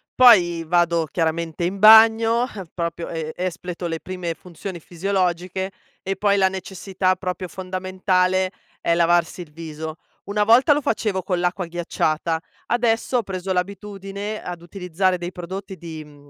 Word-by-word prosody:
poi 175 Hz, -10 st, +6 dB
vado 170 Hz, -1 st, +2 dB
chiaramente 165 Hz, 0 st, -1 dB
in 190 Hz, +3 st, -2 dB
bagno, 225 Hz, +2 st, +7 dB
eh, 195 Hz, -4 st, -7 dB
proprio 170 Hz, -1 st, -3 dB
e 160 Hz, -2 st, -4 dB
espleto 180 Hz, -1 st, -4 dB
le 165 Hz, -1 st, -3 dB
prime 180 Hz, -3 st, -4 dB
funzioni 180 Hz, +1 st, -8 dB
fisiologiche, 185 Hz, +1 st, -2 dB, 0.3 s
e 195 Hz, +1 st, -2 dB
poi 200 Hz, -1 st, +2 dB
la 190 Hz, -1 st, +4 dB
necessità, 190 Hz, 0 st, -2 dB
proprio 185 Hz, 0 st, -4 dB
fondamentale, 185 Hz, 0 st, 0 dB, 0.3 s
è 170 Hz, -, +2 dB
lavarsi 175 Hz, +1 st, +2 dB
il 155 Hz, -3 st, -11 dB
viso; 160 Hz, 0 st, -7 dB, 0.3 s
una 210 Hz, +1 st, +1 dB
volta 245 Hz, +7 st, +6 dB
lo 295 Hz, -, 0 dB
facevo 210 Hz, -6 st, -1 dB
con 180 Hz, 0 st, -1 dB
l'acqua 180 Hz, 0 st, -1 dB
ghiacciata, 165 Hz, -1 st, -1 dB, 0.3 s
adesso 235 Hz, +1 st, +1 dB
ho 235 Hz, -, 0 dB
preso 190 Hz, -1 st, -3 dB
l'abitudine 200 Hz, +2 st, -4 dB
ad 175 Hz, -1 st, -7 dB
utilizzare 180 Hz, 0 st, -1 dB
dei 175 Hz, +1 st, -5 dB
prodotti 190 Hz, +2 st, -7 dB
di, 160 Hz, -2 st, -8 dB
mhmm, 145 Hz, -1 st, -18 dB
185 Hz, 145 wpm, -22 LUFS, 170-195 Hz, 0.3 s, bagno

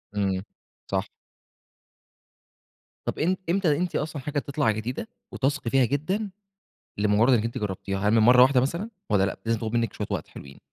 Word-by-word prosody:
امم، 95 Hz, -2 st, 0 dB, 0.5 s
صح. -, -, -1 dB, 2.0 s
طب -, -, -3 dB
إم 180 Hz, +4 st, +2 dB
إمتى 170 Hz, -5 st, +2 dB
أنتِ 175 Hz, +1 st, -2 dB
أصلًا 150 Hz, -1 st, -2 dB
حاجة 145 Hz, +2 st, -2 dB
تطلع 140 Hz, -4 st, 0 dB
جديدة، 115 Hz, -, -4 dB, 0.2 s
وتثقي 135 Hz, -2 st, -1 dB
فيها 135 Hz, +1 st, +4 dB
جدًا، 185 Hz, -, -1 dB, 0.7 s
لمجرد 105 Hz, +5 st, +4 dB
إن 115 Hz, -3 st, +3 dB
أنتِ 115 Hz, 0 st, -3 dB
جربتيها؟ 95 Hz, -1 st, -3 dB
هل -, -, +4 dB
من 115 Hz, -, +5 dB
مرّة 125 Hz, +3 st, +7 dB
واحدة 130 Hz, 0 st, +6 dB
مثلًا، 170 Hz, -, -2 dB, 0.2 s
والّا 100 Hz, -2 st, +3 dB
لأ 100 Hz, -, -2 dB
لازم 115 Hz, -1 st, +1 dB
تاخد 110 Hz, 0 st, -4 dB
منِك 115 Hz, -2 st, 0 dB
شوية -, -, -4 dB
وقت -, -, -2 dB
حلوين؟ 70 Hz, 0 st, -12 dB
125 Hz, 170 wpm, -26 LUFS, 105-150 Hz, 2.0 s, مرّة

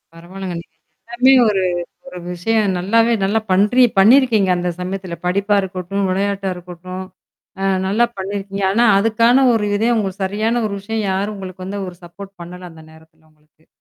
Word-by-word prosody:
பரவால்லங்க. 180 Hz, +1 st, -7 dB
நீங்க -, -, -23 dB, 0.3 s
எல்லாமே 250 Hz, +3 st, +3 dB, 0.2 s
ஒரு 195 Hz, -2 st, 0 dB, 0.5 s
ஒரு 180 Hz, -, -9 dB
விஷயம் 200 Hz, +2 st, 0 dB
நல்லாவே 230 Hz, +5 st, +2 dB
நல்லா 205 Hz, +3 st, +1 dB
பன்றி 210 Hz, +7 st, +4 dB
பண்ணியிருக்கீங்க 220 Hz, -2 st, +5 dB
அந்த 175 Hz, 0 st, -2 dB
சமயத்தில 185 Hz, -1 st, -5 dB
படிப்பா 200 Hz, +3 st, +1 dB
இருக்கட்டும், 190 Hz, +1 st, -3 dB
விளையாட்டா 195 Hz, 0 st, -1 dB
இருக்கட்டும் 180 Hz, +1 st, -8 dB, 0.6 s
அ -, -, 0 dB, 0.2 s
நல்லா 215 Hz, +5 st, +2 dB
பண்ணியிருக்கீங்க. 195 Hz, 0 st, -4 dB
ஆனா 235 Hz, +4 st, +3 dB
அதுக்கான 230 Hz, +5 st, +3 dB
ஒரு 220 Hz, -2 st, +1 dB
இதையும் 230 Hz, +3 st, +1 dB
உங்களுக்கு 195 Hz, -1 st, -3 dB
சரியான 220 Hz, +4 st, -1 dB
ஒரு 200 Hz, -, -4 dB
விஷயம் 220 Hz, +1 st, -3 dB
யாரும் 200 Hz, +3 st, -2 dB
உங்களுக்கு 185 Hz, -1 st, -8 dB
வந்து 200 Hz, +1 st, -4 dB
ஒரு 175 Hz, -, -10 dB
சப்போர்ட் 195 Hz, +3 st, -11 dB
பண்ணல 180 Hz, +1 st, -9 dB
அந்த 160 Hz, -1 st, -14 dB
நேரத்துல 160 Hz, 0 st, -21 dB
உங்களுக்கு. 155 Hz, +1 st, -33 dB
195 Hz, 155 wpm, -18 LUFS, 180-215 Hz, 0.6 s, பண்ணியிருக்கீங்க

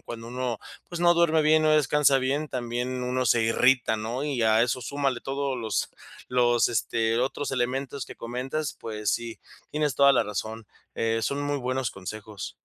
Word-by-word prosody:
cuando 115 Hz, 0 st, -8 dB
uno, 125 Hz, -2 st, -2 dB, 0.3 s
pues, 175 Hz, -1 st, -5 dB
no 175 Hz, 0 st, +6 dB
duerme 165 Hz, -2 st, +3 dB
bien, 155 Hz, +1 st, +4 dB
no -, -, +4 dB
descansa 150 Hz, -2 st, +4 dB
bien, 140 Hz, +4 st, -1 dB
también 125 Hz, +1 st, -3 dB
uno 125 Hz, 0 st, 0 dB
se 115 Hz, 0 st, +4 dB
irrita, 120 Hz, 0 st, +3 dB
¿no?, 120 Hz, +6 st, -3 dB
y 140 Hz, -5 st, -2 dB
a 110 Hz, 0 st, +4 dB
eso 125 Hz, +1 st, 0 dB
súmale 135 Hz, 0 st, -1 dB
todos 135 Hz, -1 st, -2 dB
los 110 Hz, -3 st, -2 dB, 0.4 s
los, 120 Hz, -1 st, +3 dB
este, 115 Hz, 0 st, 0 dB
otros 135 Hz, +3 st, -1 dB
elementos 135 Hz, +2 st, -2 dB
que -, -, -9 dB
comentas, 130 Hz, +5 st, -4 dB
pues 105 Hz, -2 st, -3 dB
sí, 115 Hz, -1 st, -3 dB, 0.3 s
tienes 150 Hz, -3 st, 0 dB
toda 140 Hz, 0 st, +6 dB
la -, -, +3 dB
razón, 110 Hz, +2 st, -5 dB, 0.3 s
eh, 115 Hz, 0 st, 0 dB
son 140 Hz, +1 st, -1 dB
muy 145 Hz, 0 st, -1 dB
buenos 130 Hz, -2 st, -1 dB
consejos. 100 Hz, +2 st, -7 dB
125 Hz, 175 wpm, -26 LUFS, 115-140 Hz, 0.4 s, no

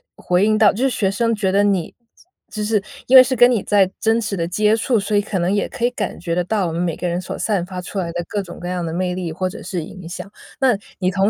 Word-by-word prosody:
回 180 Hz, +2 st, +1 dB
应 215 Hz, 0 st, +3 dB
到 210 Hz, -1 st, +6 dB
就 235 Hz, -, -3 dB
是 270 Hz, -, +3 dB
学 205 Hz, -6 st, 0 dB
生 230 Hz, +2 st, 0 dB
觉 200 Hz, -3 st, 0 dB
得 200 Hz, +1 st, +3 dB
你 195 Hz, -5 st, 0 dB, 0.6 s
就 215 Hz, -, -3 dB
是 210 Hz, -1 st, +1 dB, 0.3 s
因 260 Hz, -, +8 dB
为 255 Hz, -, +11 dB
是 260 Hz, 0 st, -1 dB
跟 245 Hz, +1 st, +6 dB
你 230 Hz, -5 st, +1 dB
在 195 Hz, -2 st, +3 dB
真 225 Hz, +1 st, +2 dB
实 210 Hz, -3 st, -3 dB
地 165 Hz, -, -1 dB
接 210 Hz, +4 st, +2 dB
触， 235 Hz, +1 st, +1 dB
所 210 Hz, +1 st, -1 dB
以 -, -, +4 dB
可 200 Hz, -2 st, -3 dB
能 175 Hz, +2 st, +1 dB
也 205 Hz, -, 0 dB
可 260 Hz, -, -7 dB
以 240 Hz, -, +4 dB
感 210 Hz, -5 st, -4 dB
觉 170 Hz, -1 st, -3 dB
得 180 Hz, -, +1 dB
到 200 Hz, -1 st, 0 dB
我 -, -, -3 dB
们 170 Hz, +2 st, -2 dB
每 170 Hz, -3 st, -1 dB
个 -, -, -6 dB
人 175 Hz, +1 st, -1 dB
所 180 Hz, -, -6 dB
散 200 Hz, -5 st, 0 dB
发 180 Hz, 0 st, -6 dB
出 195 Hz, +2 st, -5 dB
来 175 Hz, -, -2 dB
的 175 Hz, -, -2 dB
各 205 Hz, -, -1 dB
种 180 Hz, -3 st, -10 dB
各 175 Hz, -, -4 dB
样 180 Hz, -1 st, -2 dB
的 160 Hz, -, -4 dB
魅 180 Hz, 0 st, -1 dB
力 180 Hz, -3 st, -4 dB
或 185 Hz, +2 st, -2 dB
者 220 Hz, -, -9 dB
是 175 Hz, -4 st, -4 dB
影 175 Hz, +2 st, -10 dB
响。 195 Hz, +3 st, -7 dB, 0.3 s
那 255 Hz, -5 st, +4 dB, 0.2 s
你 185 Hz, -1 st, +1 dB
同 195 Hz, +1 st, +2 dB
195 Hz, 320 characters per minute, -20 LUFS, 180-215 Hz, 0.6 s, 为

